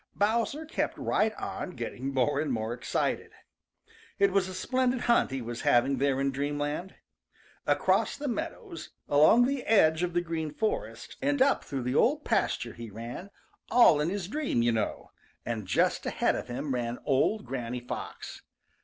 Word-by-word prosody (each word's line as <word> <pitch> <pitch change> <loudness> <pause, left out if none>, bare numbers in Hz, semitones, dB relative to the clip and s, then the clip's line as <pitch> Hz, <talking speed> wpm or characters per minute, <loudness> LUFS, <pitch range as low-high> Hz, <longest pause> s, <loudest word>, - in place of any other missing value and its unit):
Bowser 230 +9 0
kept 315 - -2
right 220 +1 +1
on 180 - -5
getting 125 +3 -4
more 140 +2 +1
and 150 -2 -1
more 110 -1 -2
excited. 120 - -2 0.8
It 200 0 +4
was 190 -1 +2
a 185 - -7
splendid 255 +4 0
hunt 235 -1 +3
he 135 -2 -4
was 120 0 -5
having 130 +3 +3
there 135 -1 +1
in 135 0 +1
dreamland. 145 +6 -3 0.7
Across - - +2
the 290 - -6
Green 255 - 0
Meadows, 335 +3 -6 0.2
along 155 +12 +6
the 275 0 -1
edge 160 -7 +4
of 175 -1 -1
the 175 - +3
Green 160 -3 -3
Forest, 360 - -3
and 285 0 +1
up 270 +2 +3
through 135 -3 -4
the 125 +1 -1
Old - - +2
Pasture - - 0
he 115 -1 -8
ran, 115 - -7 0.4
all 235 -12 +6
in 155 - 0
his 190 -2 -3
dream, 265 - 0
you 120 - +3
know, 110 -2 -2 0.3
and 110 -5 -3
just - - +1
ahead - - +1
of - - -5
him 130 +3 -3
ran 120 -1 -2
old 150 +10 +1
Granny 125 -1 -4
Fox. 120 - -7
150 Hz, 170 wpm, -29 LUFS, -, 0.8 s, along